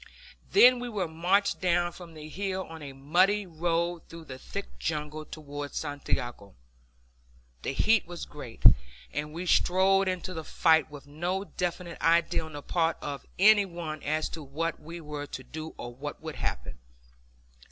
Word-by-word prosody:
Then 250 -9 +8
we 245 0 -4
were 200 -6 -1
marched 180 +5 +1
down 175 -1 +2
from 170 -2 -11
the 155 0 -8
hill 190 +3 -2
on 160 -1 -10
a 140 -2 -6
muddy 180 +10 +3
road 170 0 0
through 165 -1 -10
thick 95 - -7
jungle 150 - -3
towards 145 -2 -6
Santiago. 125 -8 -3 1.1
The - - -2
heat 220 +7 +3
was 175 -1 -6
great, 125 -6 -10 0.5
and 150 +1 -3
we 170 +3 -5
strolled 190 +2 +4
into 185 0 -2
the 160 -2 -5
fight 160 +1 +3
with 145 -2 -10
no 175 +7 -2
definite 180 -2 -4
idea 165 0 +3
on 160 -1 -9
the 145 -1 -7
part 165 -2 +1
of 140 -1 -6
any 205 +1 +7
one 165 -4 -5
as 155 +1 0
to 160 - -6
what 155 +4 -3
we 165 +2 -8
were 150 -1 -5
to 130 - -7
do 155 +5 -7
or 120 0 -6
what 145 +4 -6
would 160 -1 -7
happen. - - -3
165 Hz, 165 wpm, -29 LUFS, 150-180 Hz, 1.1 s, Then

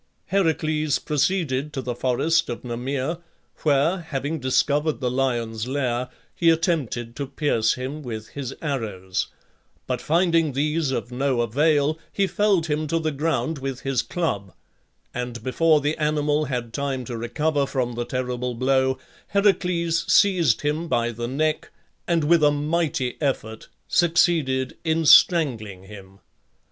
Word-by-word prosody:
Heracles 155 -5 +1
proceeded 150 -2 0
to 135 - -3
the 125 0 -2
forest 130 +7 +1
of 120 - -5
Nemea, 130 +6 -3 0.4
where, 155 +5 +2
having 155 -1 -3
discovered 145 +4 +1
the 125 -2 -1
lion's 120 -3 -1
lair, 125 -2 -1 0.2
he 170 - +3
attempted 150 - 0
to 140 -2 -3
pierce 130 -5 +1
him 130 +4 -5
with 110 -5 -6
his 135 -2 -6
arrows; 105 -10 -2 0.6
but - - -2
finding 165 -2 +2
these 150 +2 0
of 125 -2 -3
no 130 -1 0
avail 145 +5 +2
he 200 - +1
felled 195 -3 +2
him 155 -1 -1
to 165 - 0
the 160 -1 -1
ground 160 +1 -1
with 135 -1 -4
his 135 -3 0
club, 100 - -3 0.6
and 120 -2 -5
before 150 +5 +3
the 145 +2 0
animal 150 0 +1
had 120 -4 -4
time 135 -3 -2
to 120 - -5
recover 140 +5 0
from 125 -3 -1
the 120 +1 -2
terrible 125 0 -3
blow, 130 +1 +2 0.3
Heracles 180 -4 +1
seized 175 - +4
him 150 +3 -1
by 120 -4 +1
the 120 +1 -4
neck 155 +4 -1 0.4
and, 170 -2 +2
with 160 +1 +4
a 150 - +7
mighty 145 -3 -1
effort, 110 -6 -2 0.2
succeeded 160 -7 +2
in 160 0 +1
strangling 115 - +4
him. 95 -1 -12
140 Hz, 140 wpm, -24 LUFS, 125-160 Hz, 0.6 s, a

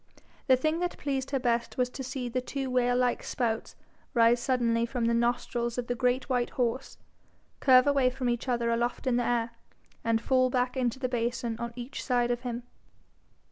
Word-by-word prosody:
The 260 - +7
thing 310 +5 0
that 355 0 -2
pleased 270 -2 -2
her 275 - 0
best 235 -2 -1
was 250 -1 +2
to 265 - -6
see 260 -1 -4
the 250 +1 -2
two 265 0 -4
whale 245 -1 +2
like 250 -1 +1
spouts 230 -3 -2 0.4
rise 235 +1 +5
suddenly 235 -2 +1
from 235 0 -1
the 235 - +2
nostrils 235 0 0
of 245 - -2
the 245 - -1
great 250 +1 0
white 250 -3 0
horse, 250 +1 -2 0.6
curve 255 -2 +6
away 280 -3 +3
from 255 0 -3
each 240 +2 -1
other 235 -2 +1
aloft 240 +3 -1
in 250 -2 +2
the 245 - +1
air, 235 -1 0 0.5
and 230 0 +2
fall 255 +2 +2
back 250 0 0
into 250 -2 0
the 260 -1 -1
basin 235 -1 -2
on 235 0 -4
each 245 +2 -6
side 245 -2 +1
of 240 0 -2
him. 245 -1 -4
245 Hz, 195 wpm, -29 LUFS, 235-255 Hz, 0.6 s, The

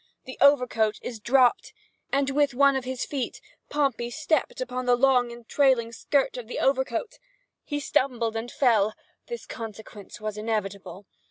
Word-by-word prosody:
The 260 -2 -10
overcoat 250 -6 +4
is 235 -3 -6
dropped, 260 - +3 0.4
and, 275 0 +1
with 285 -2 +1
one 280 +1 +5
of 265 -1 -2
his 255 -1 -3
feet, 270 -4 -4 0.3
Pompey 270 -5 0
stepped 310 +1 -1
upon 255 0 -4
the 245 - +5
long 250 -1 +3
and 235 -1 -12
trailing 260 -5 +2
skirt 270 +4 0
of 240 -3 -7
the - - -5
overcoat. 270 - 0 0.4
He 290 - -3
stumbled 245 -5 0
and 225 +2 -4
fell—this 235 - -1
consequence 220 -3 -9
was 215 0 -5
inevitable. 205 -3 -4
250 Hz, 150 wpm, -26 LUFS, 225-275 Hz, 0.4 s, one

